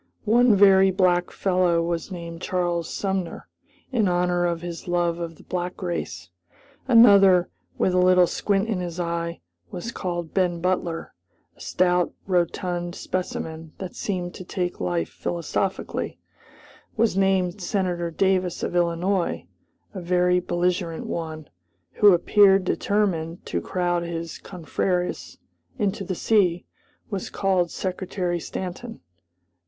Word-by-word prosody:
One 235 +1 +5
very 195 -1 +6
black 180 -1 +2
fellow 180 -3 +1
was 170 +2 -3
named 170 -1 -7
Charles 175 -3 -1
Sumner, 190 -3 -3 0.4
in 225 -6 +2
honor 175 0 +1
of 170 -1 -3
his 170 0 -7
love 175 -1 0
of 165 -1 -5
the - - -17
black 180 0 -4
race; 95 - -4 0.6
another, 200 -7 +7 0.3
with 185 - +1
a 180 - +3
little 180 0 +6
squint 200 +3 0
in 215 -5 -1
his 175 -1 -5
eye, 170 -1 -3 0.3
was 225 +6 -5
called 175 -6 -4
Ben 180 -3 +1
Butler; 175 -2 -2 0.4
a - - -18
stout, 180 -1 +1
rotund 175 -1 -1
specimen 160 -3 -4
that 185 -2 -7
seemed 180 -3 -3
to - - -8
take 180 0 -3
life 85 -2 -1
philosophically, 175 +3 -3 0.8
was 225 -3 +2
named 190 0 +1
Senator 180 -3 -1
Davis 185 0 0
of - - -2
Illinois; 175 +2 0 0.5
a 190 - -6
very 180 +1 +2
belligerent 175 -1 -1
one, 155 -2 -5 0.4
who 205 -1 +6
appeared 195 +2 +5
determined 180 -5 -1
to 85 - -2
crowd 175 - -1
his 170 -1 -5
confrères 180 0 -3 0.4
into 205 -3 -1
the 185 0 -3
sea, 180 -4 +2 0.5
was 195 -2 -3
called 185 -3 +1
Secretary 180 -1 -3
Stanton. 190 +8 -6
180 Hz, 125 wpm, -24 LUFS, 170-190 Hz, 0.8 s, another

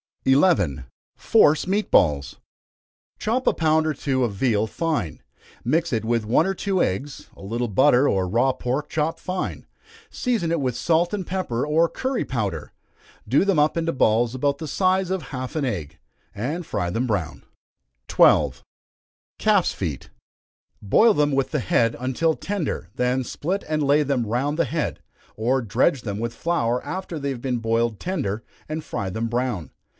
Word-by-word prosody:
11. 135 - +3 0.3
Force 150 +1 +4
Meat 205 +3 0
Balls. 75 -4 +2 0.8
Chop 245 +4 -1
a - - +5
pound 160 -1 +2
or 155 - +1
two 130 -2 -1
of 115 -4 -1
veal 110 0 +1
fine 150 - -2 0.4
mix 160 +6 +1
it 110 -2 0
with 115 -1 0
one 120 +9 +3
or 195 - 0
two 190 -1 0
eggs, 135 +10 -2
a - - -15
little 115 +5 -2
butter, 130 +5 +4
or 95 -1 +1
raw 120 +8 +2
pork 130 +3 -3
chopped 160 +1 -1
fine 185 0 -4 0.5
season 230 -10 -1
it 170 - +1
with 130 -3 -1
salt 170 +6 +2
and 195 -3 -2
pepper, 180 -11 -2
or 160 +3 +3
curry 260 -1 -2
powder. 100 - -3 0.6
Do 140 +9 +3
them 195 -4 +2
up 150 +1 +3
into 165 0 0
balls 120 0 +2
about 140 +2 0
the 160 - -5
size 185 +3 +1
of 190 -4 -1
half 130 0 -5
an 150 -3 0
egg, 80 - -4 0.4
and 150 - -3
fry 90 -10 -2
them 115 +7 -1
brown. 100 -8 -2 0.6
12. - - +4 0.8
Calf's - - +3
Feet. - - -5 0.7
Boil 215 - +4
them 150 0 +2
with 135 -1 +1
the 150 - 0
head, 115 +1 +1
until 130 +6 0
tender, 180 - -3
then 125 +1 +1
split 180 +10 -3
and 155 -1 0
lay 145 +2 +4
them 135 -4 0
round 135 +7 -1
the 170 - +3
head, 160 -2 -2 0.4
or 125 +5 +1
dredge 125 - +1
them 100 -3 -4
with 115 0 -3
flour 125 -8 0
after 185 -2 -5
they 140 0 -2
have 130 -3 -4
been 125 -2 -1
boiled 115 -1 0
tender, 130 - -3 0.3
and 155 0 -4
fry 95 - -4
them 110 +5 -2
brown. 120 - -2
135 Hz, 170 wpm, -23 LUFS, 115-165 Hz, 0.8 s, a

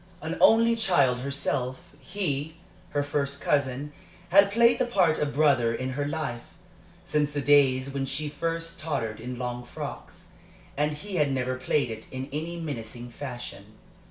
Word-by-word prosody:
An - - -4
only 230 +1 +6
child 145 - +3
herself, 140 -1 -2
he, 155 -1 -3 0.3
her 145 -1 0
first 140 -1 -1
cousin, 140 0 0 0.4
had 200 +2 +7
played 235 +3 +4
the 255 - +3
part 185 -9 +3
of 145 -1 -1
brother 130 -6 +3
in 130 +2 -3
her 145 +2 -2
life, 145 -6 -3 0.6
since 150 -1 0
the 145 - -1
days 135 -2 +4
when 135 -1 -2
she 140 +3 -2
first 165 +2 -3
tottered 125 -9 -2
in 125 +2 -6
long 125 0 -4
frocks, - - -8 0.5
and 150 +1 +1
he 190 +5 -5
had 145 -3 +2
never 130 -1 -1
played 130 0 0
it 110 0 -8
in 130 +1 -5
any 165 +3 -3
mincing 120 -5 -6
fashion. 120 -6 -8
140 Hz, 155 wpm, -27 LUFS, 130-155 Hz, 0.6 s, had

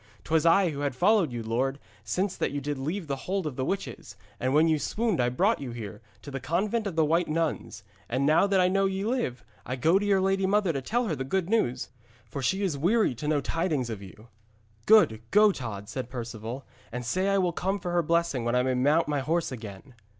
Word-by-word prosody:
'Twas 160 +1 +2
I 180 0 +4
who 140 - -6
had 140 -3 -1
followed 190 - +3
you, 120 -1 -4
lord, 130 +5 -1 0.3
since 180 - -1
that - - -1
you 145 - -3
did 145 0 -4
leave 165 +7 -3
the 140 -2 -2
hold 195 -2 0
of 150 -4 -4
the 130 - -2
witches, 185 - -4 0.2
and 130 - 0
when 155 +4 +4
you 155 -2 +2
swooned 215 - 0
I 120 - +2
brought 190 - +1
you 135 - -5
here, 115 -1 -7 0.2
to 145 - -8
the 135 - -4
convent 200 - -1
of 185 - -5
the 160 -1 +3
White 165 +3 +2
Nuns. 160 0 -2 0.3
And 130 +3 0
now 155 +7 +4
that 195 -1 +2
I 180 - +4
know 195 +1 +2
ye 190 +1 -2
live, 220 - -2 0.2
I 125 - -4
go 165 +8 +3
to 205 - -2
your 195 -1 +4
lady 195 0 +1
mother 200 -3 +2
to 135 - -2
tell 240 - 0
her 165 - -1
the 130 - -3
good 185 +6 -1
news, 170 - 0 0.4
for 140 - -6
she 190 +10 0
is 160 -8 -1
weary 205 - +2
to 130 +5 -6
know 150 -2 +2
tidings 150 -7 -1
of 105 -3 -6
you.' 105 +4 -13 0.6
'Go, 220 0 +8 0.2
good 210 -1 +5
Tod,' 105 - -6
said 125 +1 -5
Perceval, 120 +1 -6 0.3
'and 125 +1 -5
say 185 +10 0
I 195 - +3
will 180 -3 +1
come 190 +4 -1
for 180 -2 -4
her 175 0 +2
blessing 170 -5 0
when 120 +1 0
I 125 - +3
may 130 0 +1
mount 145 +6 +2
my 145 -1 0
horse 160 +4 -1
again.' 110 +1 -9
155 Hz, 240 wpm, -27 LUFS, 130-190 Hz, 0.6 s, Go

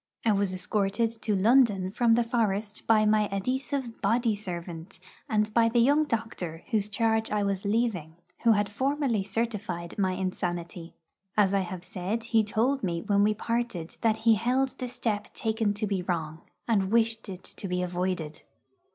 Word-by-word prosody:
I 225 - +5
was 200 -2 +1
escorted 200 +4 0
to 210 -3 0
London 205 -3 +4
from 230 +2 +3
the 235 +1 +4
forest 215 -3 -1
by 215 -2 +5
my 210 -1 +3
adhesive 255 +4 -2
body 230 +2 +2
servant, 175 -3 -7 0.3
and 215 -2 +1
by 230 0 +4
the 235 - -1
young 285 +6 +4
doctor 215 - -4
whose 210 -2 +1
charge 220 +1 +1
I 210 -1 0
was 200 0 -2
leaving, 200 -7 0 0.3
who 230 -1 +5
had 205 -1 +1
formally 260 -1 0
certified 210 -4 -3
my 190 -2 +2
insanity. 175 -2 -4 0.4
As 200 -2 +4
I 200 - +3
have 185 -1 -5
said, 195 +5 -3
he 225 -1 +3
told 240 +6 0
me 170 -4 -2
when 200 -1 +2
we 210 +1 +3
parted 230 -7 -3
that 220 -2 +2
he 230 - +7
held 250 +5 +1
the 250 - -3
step 220 -4 -3
taken 220 -2 0
to 210 - -2
be 195 -3 -1
wrong, 165 -3 -3 0.3
and 200 -4 +1
wished 225 -1 +1
it 185 -1 -8
to 195 - -7
be 180 0 -1
avoided. 175 -3 -3
210 Hz, 170 wpm, -28 LUFS, 185-230 Hz, 0.4 s, he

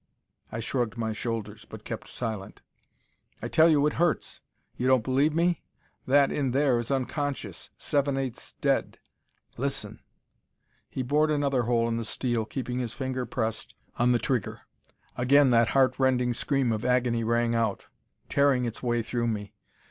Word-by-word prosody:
I 115 - -4
shrugged 120 -1 -2
my 110 -1 -2
shoulders, 110 -1 -4
but - - -10
kept - - -6
silent. 110 -5 -5 0.8
"I - - -4
tell 160 +1 +5
you 150 -2 +4
it 150 - +1
hurts. 175 -3 0 0.3
You 125 - -1
don't 130 -3 +4
believe 135 +5 +2
me? 170 +1 +1 0.5
That 140 +1 +4
in 135 -4 -1
there 135 -3 +3
is 120 - -4
unconscious, 140 +1 -3
seven 140 -1 0
eighths 130 -3 -4
dead. - - +1 0.6
Listen." - - -2 0.9
He 130 - -3
bored 150 +4 +2
another 140 -4 +1
hole 115 -1 +2
in 115 0 -1
the 115 - -2
steel, 120 -1 -1
keeping 125 +1 -4
his 120 -3 -3
finger 130 -2 -3
pressed 110 -3 -3 0.2
on 120 +1 +4
the 120 - +4
trigger. 125 -3 -2 0.6
Again 135 +2 +5
that 115 -1 +5
heart 135 0 +3
rending 125 -2 +2
scream 135 0 0
of 110 -1 -2
agony 125 -2 +1
rang 115 +1 +1
out, 115 -4 0 0.4
tearing 140 -3 +3
its 115 -1 -4
way 120 -2 0
through 120 +1 -1
me. 105 -3 -3
125 Hz, 160 wpm, -27 LUFS, 115-140 Hz, 0.9 s, tell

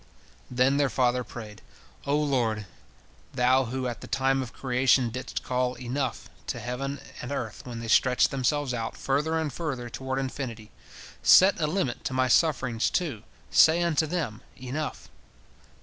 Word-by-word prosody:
Then 130 +3 +2
their 145 -1 +2
father 125 -1 +1
prayed: 110 -4 -10 0.5
"O 140 - +2
Lord, 120 -8 0 0.7
Thou 130 +1 +3
who 130 +2 -3
at 120 -2 -5
the - - -8
time 135 0 +1
of 125 -2 -6
creation 125 -2 +2
didst 130 +3 -5
call 125 0 -1
Enough! 130 +3 -3 0.2
to - - -3
heaven 135 +3 -4 0.2
and 120 - -6
earth 120 -6 -4
when 115 -2 -6
they 115 - -6
stretched 125 +3 +4
themselves 135 +1 0
out 115 -2 -4
further 150 +4 0
and 155 -4 -2
further 130 -7 -4
toward 130 +1 -4
infinity, 125 -5 -5 0.5
set 190 -1 +6
a 150 - +2
limit 150 -7 -2
to - - -2
my 130 0 +2
sufferings, 125 -5 +2
too, 145 - -2 0.3
say 165 +2 +6
unto 160 -2 +1
them, 150 -10 -3 0.2
Enough! 130 +4 -5
130 Hz, 155 wpm, -27 LUFS, 120-145 Hz, 0.7 s, set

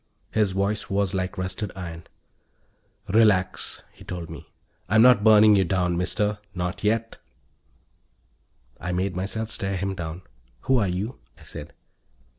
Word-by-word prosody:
His 105 -4 +1
voice 100 +2 -1
was 100 -1 0
like 95 0 -2
rusted 95 +2 -3
iron. 85 -3 -7 1.0
"Relax," 100 -3 +2
he - - -15
told 85 -3 -6
me. 80 0 -11 0.4
"I'm 110 +3 +6
not 125 -4 +6
burning 105 -1 +7
you 95 - +4
down, 90 0 0
Mister. 105 +4 0 0.2
Not 90 +1 -3
yet." 115 +2 0 1.6
I 90 +2 -3
made 95 +1 -1
myself 110 +4 -3
stare 95 0 -2
him 95 +1 -2
down. 85 -1 -6 0.4
"Who 130 -2 +2
are 100 - +1
you?" 95 +8 -3 0.2
I - - -17
said. 75 - -9
95 Hz, 140 wpm, -25 LUFS, 90-105 Hz, 1.6 s, burning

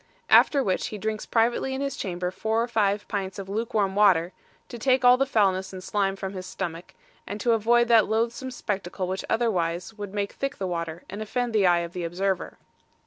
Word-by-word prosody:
After 280 -2 +6
which 190 -4 0
he 215 - -6
drinks 215 +1 -3
privately 240 +3 +1
in 265 - -3
his 280 -1 -2
chamber 180 -1 -3
four 220 +4 0
or - - -3
five 205 -3 0
pints 195 -2 -3
of 195 -1 -6
luke 225 +4 -3
warm 200 -3 +2
water, 185 -4 +4 0.3
to 240 - -8
take 255 +1 +2
all 245 0 +8
the 270 +2 0
foulness 190 -6 +1
and 185 -1 -8
slime 195 0 0
from 195 0 -5
his 185 -1 -6
stomach, 175 -2 -6 0.3
and 205 - -5
to 235 - +1
avoid 235 +2 +3
that 225 -3 +6
loathsome 235 +4 -1
spectacle 195 -6 -4
which 190 +1 -3
otherwise 180 -6 0
would 205 -2 -7
make 200 -1 -2
thick 275 +1 -4
the 195 - -3
water, 170 -2 -4
and 205 +2 -7
offend 240 +2 -2
the 205 -4 +4
eye 175 -1 +4
of 170 0 -6
the 180 - -4
observer. 185 +2 -2
205 Hz, 210 wpm, -26 LUFS, 185-230 Hz, 0.3 s, all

